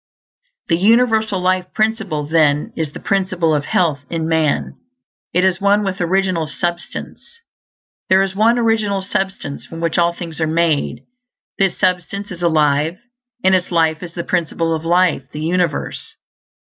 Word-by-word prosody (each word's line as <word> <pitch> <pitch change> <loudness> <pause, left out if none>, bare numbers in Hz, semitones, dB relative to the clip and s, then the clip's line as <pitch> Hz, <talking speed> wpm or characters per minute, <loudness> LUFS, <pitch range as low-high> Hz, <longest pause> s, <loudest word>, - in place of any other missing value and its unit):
The 165 - +2
universal 220 -1 +3
Life 185 0 0
Principle, 215 -9 0
then, 150 -2 +2
is 160 -3 -2
the - - -9
Principle 185 -4 0
of 145 -1 0
Health 165 -6 +1
in 165 -1 -2
man. 160 -3 +1 0.6
It 180 +2 +2
is 190 0 +1
one 200 +1 +3
with 195 -1 -3
original 180 -2 +1
substance. 175 - -5 0.7
There 190 +1 +5
is 195 -1 -3
one 225 +4 +3
Original 220 -4 +1
Substance 190 -7 -3
from 165 - -8
which 165 0 0
all 170 0 +3
things 170 -2 -7
are 160 - +2
made; 155 -6 0 0.6
this 195 -2 +2
substance 185 +3 -1
is 175 -1 -8
alive, 155 0 +2 0.5
and 190 - +4
its 185 -1 +1
life 160 -2 +1
is 170 -2 -9
the 170 - -3
Principle 165 -2 -1
of 160 0 -4
Life 175 -5 +2
of 130 - -39
the 150 - -5
universe. 170 -1 -2
175 Hz, 160 wpm, -18 LUFS, 160-195 Hz, 0.7 s, There